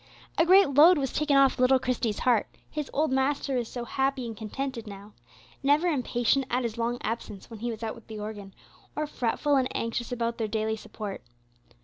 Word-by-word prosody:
A 330 - +4
great 380 -3 +7
load 320 +6 +7
was 270 -3 -2
taken 295 -2 +2
off 275 -2 +4
little 255 +1 +5
Christie's 245 -4 -1
heart, 240 -4 +2 0.2
his 300 -2 -4
old 305 -1 +1
master 270 +1 0
was 240 -2 -1
so 240 0 -6
happy 270 0 -1
and 225 -1 -6
contented 230 +2 -5
now; 200 +1 -10 0.5
never 290 +5 +3
impatient 255 -2 +1
at 250 +1 0
his 230 -2 -3
long 235 +1 0
absence 220 -1 -5
when 225 - -8
he 240 +2 -3
was 225 -1 -6
out 220 - -2
with 230 - -15
the 220 - -7
organ, 205 -2 -7 0.4
or 305 - -1
fretful 285 +1 0
and 260 -1 +2
anxious 230 +1 -3
about 235 -1 -2
their 220 - 0
daily 220 +1 -1
support. 210 -2 -7
245 Hz, 200 wpm, -27 LUFS, 225-275 Hz, 0.5 s, great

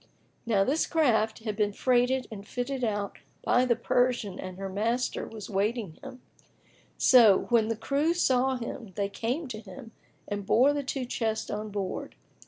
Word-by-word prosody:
Now 205 -4 +3
this 290 +9 +1
craft 225 -9 +1
had 215 -3 -3
been 205 -1 0
freighted 250 +2 +2
and 205 -1 -8
fitted 255 +2 -3
out 205 -3 -2 0.2
by 250 +1 +3
the 240 -2 +3
Persian 235 -4 0
and 185 -1 -7
her 195 0 -4
master 225 +6 -1
was 215 -3 -8
awaiting 205 -2 -2
him; 265 -2 -10 0.7
so, 225 -7 +6
when 230 -3 +3
the 225 -1 -2
crew 290 +8 0
saw 265 -5 +2
him, 230 -4 -6
they 200 -1 -1
came 250 +10 -3
to 215 -3 -5
him 215 +2 -11 0.4
and 205 -1 -3
bore 255 +8 +4
the 290 - -1
two 265 -1 -3
chests 225 -3 -2
on 210 +1 -4
board. 200 -2 -4
230 Hz, 170 wpm, -28 LUFS, 205-255 Hz, 0.7 s, so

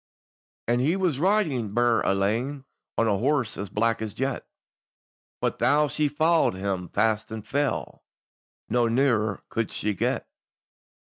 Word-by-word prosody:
And 120 +1 +2
he 155 +7 +2
was 180 -8 0
riding 155 - +1
burd 120 -1 +3
alane, 115 +8 0 0.3
On 115 - +3
a 100 -3 +1
horse 130 -3 +1
as 100 -1 -5
black 115 +3 0
as 110 -2 -4
jet, 135 0 -2 0.9
But - - -1
tho' 150 +2 +3
she 150 +1 +1
followed 160 - +2
him 95 -2 -3
fast 110 -1 +1
and 110 -1 -6
fell, 140 +3 -2 0.6
No 120 -1 +2
nearer 115 -4 +1
could 115 -2 -1
she 105 0 -1
get. 95 - -1
120 Hz, 140 wpm, -26 LUFS, 105-145 Hz, 0.9 s, burd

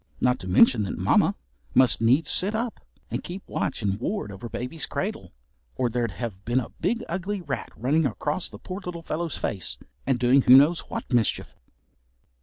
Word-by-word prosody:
Not 125 0 +2
to 90 - -8
mention 110 +5 +5
that, 100 - -3
Mamma - - +3 0.4
must 130 -3 +5
needs 130 +7 +3
sit 200 +4 +3
up, 230 +1 -2 0.3
and - - -3
keep 185 +2 -8
watch 130 - -2
and 100 0 0
ward 125 - -3
over 115 +5 -8
baby's 125 +7 -4
cradle, - - -4 0.4
or 125 -2 0
there'd 120 -1 0
have 95 0 -6
been 120 +3 +1
a 125 - -5
big 230 +7 -2
ugly 190 +4 -3
rat 175 - -4
running 145 +6 +2
across 150 - -3
the - - -10
poor 185 +2 -7
little 170 -2 -6
fellow's 165 0 -3
face, 95 -6 -2 0.3
and 135 -2 +2
doing 125 +3 +4
who 125 0 +8
knows 155 +5 +5
what - - -5
mischief. 115 -3 0
130 Hz, 185 wpm, -25 LUFS, 115-170 Hz, 0.4 s, who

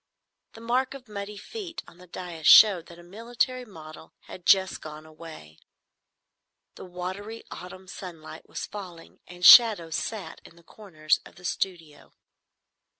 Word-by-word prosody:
The 225 - -13
mark 250 +3 -1
of 255 -2 -13
muddy 205 0 -7
feet 355 - -8
on 170 - -18
the 180 - -16
dais 170 -3 -6
showed 195 -6 +7
that 170 - -14
a 175 - -15
military 235 +6 -3
model 160 -6 -13
had 180 - -12
just 190 -1 +3
gone 155 0 -10
away. 155 - -13 1.1
The - - -11
watery 190 +5 -7
autumn 185 +1 -11
sunlight 165 -4 -11
was - - -6
falling, 180 -5 -11
and 180 0 -6
shadows 210 -9 +8
sat 200 -8 -6
in - - -17
the 170 - -21
corners 160 -6 -2
of - - -17
the 180 - -15
studio. 165 -6 -5
180 Hz, 150 wpm, -26 LUFS, 165-215 Hz, 1.1 s, shadows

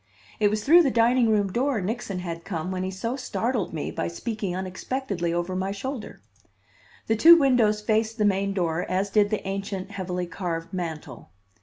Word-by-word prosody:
It 210 - +4
was 210 0 -1
through 335 +8 +7
the 290 - +2
dining 240 0 +3
room 205 -3 +2
door 260 -1 +1
Nixon 200 0 -3
had 170 -1 -5
come 175 -1 -4
when 185 -1 -3
he 185 - -2
so 215 +6 -3
startled 245 -4 -2
me 155 -3 -4
by - - -3
speaking 200 +1 -4
unexpectedly 190 0 -3
over 175 +2 -2
my 190 +1 -1
shoulder! 230 +3 -6 0.8
The 225 - +1
two 330 +10 +9
windows 245 -8 +3
faced 220 +1 0
the 210 - +2
main 200 0 +1
door, 175 -3 -1
as 195 +2 -1
did 205 0 +3
the 215 -2 -3
ancient, 195 0 -4
heavily 180 -2 -3
carved 170 -1 -5
mantel. 160 - -6
200 Hz, 180 wpm, -25 LUFS, 185-225 Hz, 0.8 s, two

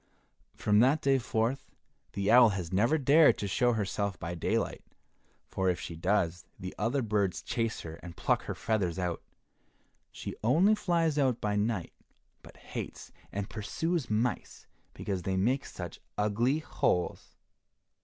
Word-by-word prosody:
From 105 0 +3
that 135 +6 +4
day 135 -1 +4
forth, 120 +3 -1 0.4
the 100 +1 0
owl 120 -1 +8
has 95 -3 -4
never 115 +11 +3
dared 145 +2 +5
to 100 - -3
show 120 +4 +2
herself 100 -2 -2
by 85 +1 -4
daylight, 85 - -1 0.6
for 95 -1 0
if 90 - 0
she 85 - -6
does 90 -1 0 0.2
the 90 0 -6
other 120 +5 0
birds 100 -5 0
chase 115 -2 -2
her 80 0 -8
and 85 -1 -11
pluck - - +1
her - - -4
feathers 95 -7 -1
out. 90 -2 -2 0.9
She - - -7
only 165 - +5
flies 165 -7 +1
out 130 -4 +2
by 105 -1 -1
night, 105 -3 -1 0.5
but - - -15
hates - - -7 0.2
and 100 0 -3
pursues 160 - -2
mice 110 +3 -2 0.3
because 95 -3 -3
they 95 +1 -1
make 125 +8 +1
such 90 -2 -7 0.2
ugly 115 +7 +1
holes. 90 - -1
105 Hz, 150 wpm, -30 LUFS, 95-130 Hz, 0.9 s, owl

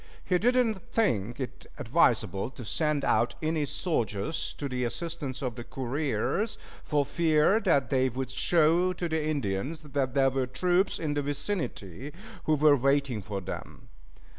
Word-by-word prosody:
He 180 -1 +2
did 245 +5 +3
not 225 -6 +2
think 120 - 0
it 130 - -6
advisable 100 +4 +2
to 130 -3 -10
send 150 +3 0
out 120 - +2
any 155 -1 0
soldiers 150 - -2
to 145 - -4
the 125 -1 -2
assistance 140 0 -4
of 125 -2 -1
the 120 - -7
couriers, 135 - -1 0.3
for 145 -1 +1
fear 160 +6 +3
that 165 -11 +2
they 130 -1 +3
would 130 +1 -4
show 170 +5 +3
to 175 - -3
the 160 -1 -1
Indians 145 0 -2
that 140 -3 -2
there 135 -1 +4
were 130 -1 0
troops 180 +8 +1
in 155 -2 -2
the 145 - 0
vicinity 140 - -3 0.3
who 155 - +3
were 150 0 +6
waiting 140 -3 +1
for 100 -1 -5
them. 95 - -8
145 Hz, 160 wpm, -28 LUFS, 130-160 Hz, 0.3 s, were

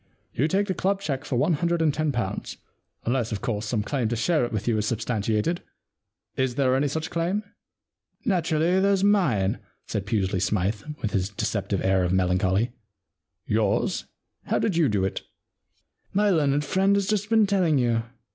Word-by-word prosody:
You 140 - +1
take 195 +5 +1
the 190 - -1
club 195 +2 0
cheque 145 -7 -3
for 135 - -2
one 150 +8 +2
hundred 170 +2 0
and 160 -3 +2
ten 155 0 0
pounds, 115 -7 -3 0.5
unless, 120 -1 0
of 105 - -3
course, 110 -4 -2
some 105 -2 0
claim 130 -1 -1
to 120 - -1
share 150 +5 +1
it 120 - -2
with 110 -1 -3
you 115 - +2
is 105 - -1
substantiated. 110 - -1 0.7
Is 130 -2 0
there 130 -2 +2
any 140 +2 +2
such 160 +3 -3
claim? 175 +5 -1 0.8
Naturally, 175 -2 +2
there's 195 0 +2
mine,* 135 - +2 0.3
said 105 -2 -4
Pusely 95 -3 0
Smythe, 100 +2 0 0.2
with 105 - -1
his 95 -1 0
deceptive 100 -1 -2
air 95 -1 +3
of 90 0 0
melancholy. 95 +4 +2 0.4
* - - -58
Yours? 110 - 0 0.4
How - - +1
did 195 - 0
you 165 -5 +3
do 100 -3 +1
it? 95 - -3 0.3
' - - -47
* - - -43
My 205 0 +4
learned 145 -3 +2
friend 195 +6 +2
has 200 -1 +1
just 210 0 -1
been 220 -2 +5
telling 185 -7 +2
you. 120 -3 +2
130 Hz, 185 wpm, -25 LUFS, 105-175 Hz, 0.8 s, been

